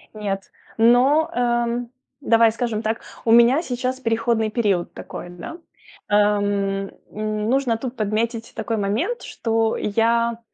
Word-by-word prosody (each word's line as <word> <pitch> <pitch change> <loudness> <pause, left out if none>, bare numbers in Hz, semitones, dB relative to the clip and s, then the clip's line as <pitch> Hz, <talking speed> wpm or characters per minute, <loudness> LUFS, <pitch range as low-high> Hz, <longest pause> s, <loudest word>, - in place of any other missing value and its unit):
Нет, 195 -2 -4 0.3
но, 260 +8 +4
э, 240 0 0 0.4
давай 230 -3 +4
скажем 230 -3 -2
так, 220 +1 -2 0.2
у 225 - +3
меня 235 +6 +6
сейчас 255 -2 -3
переходный 230 -2 0
период 205 -6 0
такой, 175 - -8
да. 175 - -8 0.5
Эм, 205 -1 +1 0.2
м, 215 0 -2
нужно 255 -4 +1
тут 255 +1 -6
подметить 225 +2 -2
такой 225 -1 -2
момент, 225 - -1
что 225 -1 0
я, 230 +2 +1
230 Hz, 125 wpm, -22 LUFS, 210-240 Hz, 0.5 s, меня